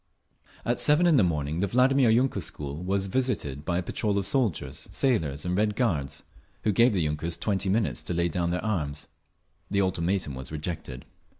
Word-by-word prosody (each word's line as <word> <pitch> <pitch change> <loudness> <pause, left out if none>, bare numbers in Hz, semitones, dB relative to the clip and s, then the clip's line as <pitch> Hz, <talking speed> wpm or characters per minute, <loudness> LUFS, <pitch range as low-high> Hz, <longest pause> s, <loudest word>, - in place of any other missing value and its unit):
At 120 0 0
seven 150 +4 +5
in 165 -4 +5
the 110 - +5
morning 75 -2 -1
the 100 - +1
Vladimir 130 +3 +4
yunker 125 +4 +2
school 75 +2 -6
was 95 +1 0
visited 95 - -1
by 85 +2 -1
a 90 - -1
patrol 100 +3 -1
of 100 - 0
soldiers, 110 - 0
sailors 80 - 0
and 90 0 0
Red 105 +1 +1
Guards, 80 - -1 0.4
who 110 - +2
gave 115 +4 +4
the 90 -4 +1
yunkers 75 +3 -2
twenty 100 -2 -1
minutes 105 +2 0
to - - -2
lay 85 0 +2
down 85 +1 -1
their 90 +5 -2
arms. 75 -9 -2 0.6
The 100 -1 +2
ultimatum 90 -3 -1
was 65 +1 -7
rejected. 75 -4 -5
95 Hz, 185 wpm, -27 LUFS, 80-110 Hz, 0.6 s, seven